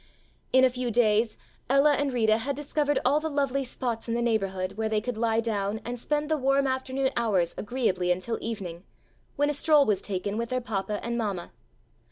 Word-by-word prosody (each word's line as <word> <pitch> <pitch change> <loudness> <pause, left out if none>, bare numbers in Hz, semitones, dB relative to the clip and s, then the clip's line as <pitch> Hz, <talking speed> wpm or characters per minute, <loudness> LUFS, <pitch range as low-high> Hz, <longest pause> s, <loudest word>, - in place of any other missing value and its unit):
In 260 0 +5
a 260 - +6
few 250 0 -2
days 225 -1 +2 0.3
Ella 275 +2 +5
and 285 -1 0
Rita 220 -3 +2
had 275 +4 -2
discovered 290 0 0
all 295 - +4
the 315 +1 -3
lovely 275 -2 0
spots 240 -3 -4
in 230 - 0
the 240 - 0
neighborhood, 195 -5 0
where 220 +2 -2
they 215 -1 +1
could 245 +2 -4
lie 225 0 +1
down 210 -2 -1
and 245 0 -4
spend 295 +4 -1
the 315 0 +1
warm 275 +1 +2
afternoon 260 0 -1
hours 200 -8 +1
agreeably 205 -6 0
until 185 +6 -1
evening, 190 -6 -5 0.5
when 290 +1 +2
a - - -3
stroll 295 0 +4
was 205 -5 +1
taken 200 +1 -3
with 235 0 -2
their 255 - 0
papa 210 -3 -3
and 235 0 -1
mamma. 200 -6 -3
235 Hz, 200 wpm, -27 LUFS, 210-270 Hz, 0.5 s, a